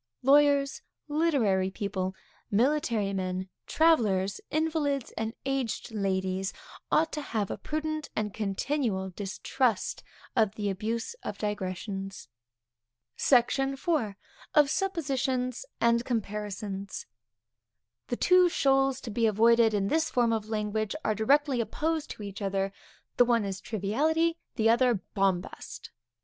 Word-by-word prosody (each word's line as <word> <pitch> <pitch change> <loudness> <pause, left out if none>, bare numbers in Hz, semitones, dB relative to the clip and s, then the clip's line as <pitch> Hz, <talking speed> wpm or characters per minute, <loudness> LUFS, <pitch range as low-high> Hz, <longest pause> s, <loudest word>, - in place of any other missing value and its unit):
Lawyers, 280 0 +4 0.3
literary 275 - +2
people, 190 -1 -3 0.3
military 230 -3 +1
men, 185 0 -2 0.2
travellers, 210 - +2
invalids 305 -4 0
and 225 +1 -4
aged 270 -4 -2
ladies, 190 -2 -1 0.4
ought 320 +1 +3
to 300 - -3
have 220 -7 -2
a - - -3
prudent 310 0 -3
and 210 -2 -2
continual 210 -1 -1
distrust 210 +4 -1 0.3
of 215 -4 +2
the 205 -2 -1
abuse 225 - -3
of 205 - -5
digressions. 195 -1 -4 0.9
SECTION 270 +2 +3
IV. 270 - -1 0.4
Of 295 -2 +5
Suppositions 265 -9 -1
and 235 0 +3
Comparisons. 205 -4 -4 1.0
The - - -1
two 365 0 +5
shoals 270 -3 +2
to 230 - -6
be 225 +2 +2
avoided 225 +1 +4
in 195 -1 +1
this 320 +6 +1
form 240 -4 +2
of 220 -1 -2
language 215 0 -1
are 215 - +2
directly 270 +4 +2
opposed 310 +7 -2
to 210 - -7
each 200 0 -7
other; 195 0 -1 0.4
the 245 - +7
one 235 -3 +2
is 195 -1 -4
triviality, 310 - 0 0.2
the 225 -2 +2
other 240 +1 +4 0.2
bombast. 190 -3 -2
225 Hz, 120 wpm, -29 LUFS, 200-275 Hz, 1.0 s, the